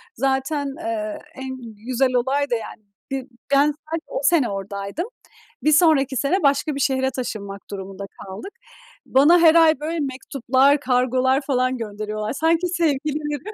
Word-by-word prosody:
Zaten, 270 +3 0
eee, 215 -7 -3 0.2
en 265 0 -6 0.3
güzel 255 0 +1
olay 270 +3 +1
da, 240 - +1
yani, 225 -1 -7 0.3
bir 270 -1 -3 0.3
ben 275 - +6
sadece 315 +2 -4
o - - -3
sene 285 -4 +3
oradaydım. 200 - -4 0.6
Bir 305 - +4
sonraki 285 -5 +4
sene 315 +9 +1
başka 280 +1 +2
bir - - -4
şehre 265 -1 +1
taşınmak 205 -6 -5
durumunda 195 0 -6 0.2
kaldık. 195 - -8 0.5
Bana 295 +7 +5
her 330 -1 +6
ay, 320 -4 +5
böyle, 320 +2 -3
mektuplar, 270 0 +1
kargolar 255 +1 +2
falan 255 -2 0
gönderiyorlar. 215 -1 -4
Sanki 325 +4 +1
sevgilileri. 300 -3 -1
270 Hz, 140 wpm, -22 LUFS, 240-300 Hz, 0.6 s, ben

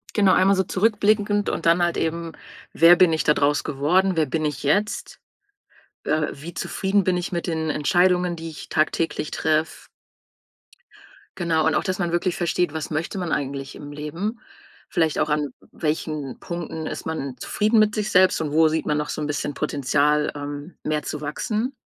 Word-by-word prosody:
Genau, 200 -3 +5
einmal 195 +2 +4
so 190 - +2
zurückblickend 205 +1 +1
und - - -3
dann 170 +1 +4
halt 175 0 +1
eben, 165 0 -2 0.4
wer 165 +2 +7
bin 180 -3 +5
ich 160 - 0
da 150 - +4
draus 145 -1 +1
geworden? 180 +7 +1
Wer 160 - +3
bin 155 +3 -2
ich 150 -2 -2
jetzt? 200 +9 0 0.9
Äh, 150 0 +1
wie 160 +5 -9
zufrieden 195 +3 0
bin 185 0 +1
ich 175 - -4
mit 170 +1 -2
den 160 -2 -1
Entscheidungen, 180 +3 +2
die 165 0 -6
ich 155 - -10
tagtäglich 155 0 0
treffe? 155 0 -1 1.5
Genau, 165 -3 +1
und - - +2
auch, - - +1
dass 185 0 -2
man 175 -2 -1
wirklich 175 +1 0
versteht, 175 -1 0
was 160 -1 -4
möchte 160 +5 -3
man 175 -3 -3
eigentlich 135 0 -3
im 145 0 -9
Leben, 165 +10 -4 0.5
vielleicht 160 -3 +1
auch, 155 - +1
an 150 -3 -1 0.2
welchen 150 -3 -3
Punkten 165 -2 -5
ist - - -6
man 140 -5 -4
zufrieden 215 +2 +1
mit 215 0 +3
sich 215 0 -2
selbst 185 -2 +4
und 150 -2 -2
wo 160 +1 +5
sieht 160 +1 -1
man 150 - 0
noch 150 0 -2
so - - -3
'n 150 - -2
bisschen 145 0 -2
Potenzial, 150 +1 +1
ähm, 145 +3 -7
mehr 150 -1 -1
zu 150 - -5
wachsen? 215 - -2
160 Hz, 185 wpm, -23 LUFS, 150-185 Hz, 1.5 s, wer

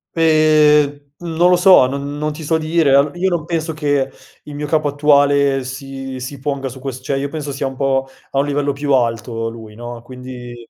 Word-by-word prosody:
Pe 155 -2 +5 0.3
mhmm, 170 -2 -6
non 175 +1 +5
lo 180 - +5
so, 180 -7 +6
non 140 +2 -5
non 150 +1 -2
ti 155 +2 -8
so 160 +2 +1
dire, 155 -3 +2
al 140 +1 +4
io 185 +2 +1
non 170 -4 -2
penso 165 -1 -2
che 145 -3 0 0.3
il 150 - -10
mio 150 +1 -4
capo 155 -1 +1
attuale 140 -1 +3
si 135 0 -7
si 130 +2 -7
ponga 135 -1 -3
su 130 +1 -11
quest 130 -1 -6
cioè 140 0 -1
io 140 +1 -2
penso 145 -2 -5
sia 135 0 -3
un 135 - -6
pò 135 0 0 0.2
a 135 - 0
un 140 - +2
livello 145 0 0
più 140 0 -1
alto 115 -2 0
lui, 110 -2 -11
no, 120 +1 -8
quindi 125 -1 -9
140 Hz, 215 wpm, -18 LUFS, 130-150 Hz, 0.3 s, so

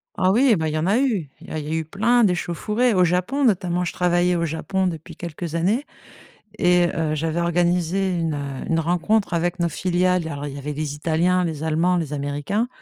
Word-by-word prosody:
Ah 185 - +2
oui, 240 +2 +4
bah, 160 -3 -1
il 155 - -2
y - - 0
en 155 +3 0
a 205 +4 +3
eu! 215 - 0
Il - - -13
y - - -10
a 155 - -2
il 150 - -6
y - - -4
a - - +1
eu 160 - -4
plein 225 +8 +2
d'échauffourées 210 +6 +1
au 185 -2 +4
Japon, 180 +11 0
notamment. 180 -5 +1
Je 175 - -3
travaillais 180 0 +2
au 170 -1 0
Japon 185 +4 -1
depuis 165 -1 -6
quelques 170 -1 -6
années 205 - +1 0.7
et 175 -2 +4
heu, 155 -2 0
j'avais 160 +2 -1
organisé 175 +2 +1
une, 165 -2 -1
heu, 140 -2 -5
une 165 - +2
rencontre 175 +6 +1
avec 175 +1 -1
nos 170 - +2
filiales. 180 +1 0
Alors, 145 -2 -5
il 140 - -6
y - - -7
avait 145 +1 -5
les 145 -1 -3
Italiens, 170 +4 +1
les 160 -3 -3
Allemands, 165 +3 +2
les 155 -4 -3
Américains 145 - -2
175 Hz, 225 wpm, -22 LUFS, 160-185 Hz, 0.7 s, oui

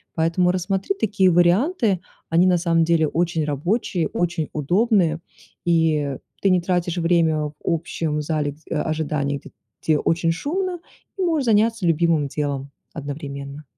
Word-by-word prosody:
Поэтому 170 +2 +2
рассмотри 190 - -1
такие 195 -3 +3
варианты, 190 - +3 0.3
они 170 +3 +4
на 180 -1 +4
самом 165 -1 +2
деле 165 -1 +2
очень 165 0 0
рабочие, 170 - -1
очень 170 -3 -2
удобные, 175 - +2 0.5
и 155 -5 +2 0.2
ты 195 - +3
не 180 -1 +3
тратишь 175 -1 -1
время 165 -2 +2
в 150 - -6
общем 160 -2 -1
зале 150 -2 -1
гд 155 +2 -24
ожидания, 150 -2 -1
гд - - -13 0.3
где 155 -1 +3
очень 165 0 +1
шумно, 355 - -2 0.4
и - - -3
можешь 320 -6 +1
заняться 225 -2 +2
любимым 165 -2 +2
делом 140 -1 -3 0.2
одновременно. 140 -1 -6
165 Hz, 140 wpm, -22 LUFS, 155-185 Hz, 0.5 s, они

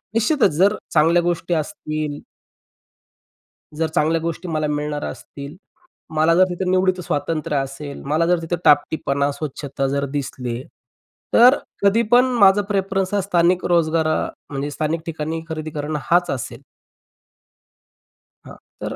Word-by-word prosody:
निश्चितच 235 -1 +3
जर 200 +4 +4 0.2
चांगल्या 165 +2 +4
गोष्टी 175 0 -1
असतील 155 -3 -3 1.6
जर 160 +1 0
चांगल्या 160 +2 +2
गोष्टी 170 +2 -4
मला 155 -2 -1
मिळणार 150 0 -3
असतील, 140 +2 -8 0.6
मला 160 +2 +4
जर 185 - +6
तिथं 180 +1 -2
निवडीत 185 0 +2
स्वातंत्र्य 155 0 -2
असेल, 135 +1 -5
मला 155 +4 +1
जर 175 0 +2
तिथं 165 +1 -2
टापटीपणा, 145 -1 +2
स्वच्छता 140 -1 -4
जर 140 +1 -1
दिसले, 125 -4 -4 0.7
तर 250 +4 +7 0.3
कधी 200 +3 +4
पण 245 +1 +6
माझा 200 0 +6
प्रेफरन्स 195 -1 -1
हा 200 - +2
स्थानिक 180 -1 +2
रोजगार 165 -2 +2 0.4
म्हणजे 140 +1 -3
स्थानिक 155 +2 -2
ठिकाणी 160 0 -4
खरेदी 155 -1 -4
करणं 150 0 -3
हाच 175 +5 +2
असेल. 130 -4 -5 1.8
हां, - - -11 0.3
तर - - -4
160 Hz, 130 wpm, -21 LUFS, 145-180 Hz, 1.8 s, तर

